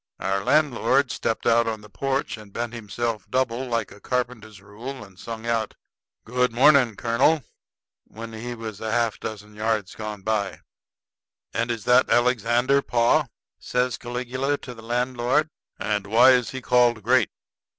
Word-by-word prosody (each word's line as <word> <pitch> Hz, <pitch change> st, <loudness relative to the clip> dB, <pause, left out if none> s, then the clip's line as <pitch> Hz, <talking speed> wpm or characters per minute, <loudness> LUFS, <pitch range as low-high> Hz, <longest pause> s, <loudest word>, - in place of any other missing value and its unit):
Our 95 Hz, 0 st, -1 dB
landlord 140 Hz, -2 st, +2 dB
stepped 110 Hz, -, -2 dB
out 115 Hz, 0 st, +4 dB
on 110 Hz, -1 st, -3 dB
the 105 Hz, -, -13 dB
porch 135 Hz, +7 st, -2 dB
and 105 Hz, -2 st, -13 dB
bent 120 Hz, +3 st, -4 dB
himself 115 Hz, -1 st, -4 dB
double 130 Hz, -1 st, 0 dB
like 115 Hz, -1 st, -2 dB
a 100 Hz, -, -13 dB
carpenter's 120 Hz, -5 st, -3 dB
rule, 110 Hz, +6 st, -8 dB
and 95 Hz, -2 st, -16 dB
sung 115 Hz, +1 st, -7 dB
out, 115 Hz, -2 st, -1 dB, 0.5 s
"Good 125 Hz, +1 st, +1 dB
morning, 130 Hz, -2 st, +5 dB
Colonel," 130 Hz, +8 st, +2 dB, 0.6 s
when 115 Hz, 0 st, -9 dB
he 120 Hz, +2 st, -5 dB
was 110 Hz, -3 st, -7 dB
a 115 Hz, +1 st, +1 dB
dozen 105 Hz, -1 st, -7 dB
yards 105 Hz, -2 st, -1 dB
gone 105 Hz, -2 st, -6 dB
by. 100 Hz, -6 st, -1 dB, 0.9 s
"And 115 Hz, +1 st, -1 dB
is 115 Hz, -2 st, -2 dB
that 125 Hz, +1 st, +4 dB
Alexander, 120 Hz, +2 st, +3 dB
pa?" 120 Hz, -3 st, +2 dB, 0.3 s
says 125 Hz, -1 st, -1 dB
Caligula 125 Hz, +3 st, -2 dB
to 125 Hz, -, -9 dB
the 115 Hz, -, -12 dB
landlord; 125 Hz, +5 st, 0 dB, 0.3 s
"and 105 Hz, -1 st, -2 dB
why 120 Hz, +5 st, +7 dB
is 125 Hz, -2 st, +3 dB
he 130 Hz, -, -6 dB
called 120 Hz, -3 st, +3 dB
great?" 125 Hz, +4 st, +3 dB
115 Hz, 150 wpm, -24 LUFS, 110-125 Hz, 0.9 s, why